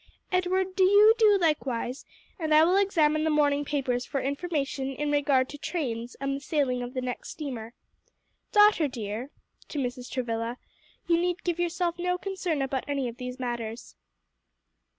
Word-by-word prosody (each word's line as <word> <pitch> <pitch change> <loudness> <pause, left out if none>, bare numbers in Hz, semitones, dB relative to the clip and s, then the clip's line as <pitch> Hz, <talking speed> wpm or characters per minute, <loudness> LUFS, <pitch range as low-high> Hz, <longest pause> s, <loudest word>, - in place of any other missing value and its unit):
"Edward, 370 +1 0
do 380 - +4
you 410 +3 +7
do 420 -2 +6
likewise, 275 -6 -1 0.3
and 315 -2 +2
I 310 - +7
will 355 +3 +3
examine 315 -6 +3
the 315 - +1
morning 290 -1 +2
papers 260 -4 -1
for 275 - -3
information 280 -1 -2
in 295 +1 -1
regard 280 -3 +3
to 290 - -9
trains 245 -9 -3
and 275 0 -2
the - - -4
sailing 275 -4 0
of 245 +2 -6
the 255 - -1
next 250 -1 -5
steamer. 245 -7 -6 0.8
Daughter 415 -7 +5
dear," 230 0 -5 0.4
to - - -7
Mrs. 250 -2 -3
Travilla, 235 -1 -3 0.5
"you 335 -1 +3
need 355 0 -1
give 345 -1 -1
yourself 345 0 -1
no 360 +1 0
concern 360 -6 -2
about 270 -1 -2
any 280 -3 -1
of 235 0 -7
these 250 0 -6
matters." 235 -2 -5
285 Hz, 165 wpm, -27 LUFS, 250-345 Hz, 0.8 s, you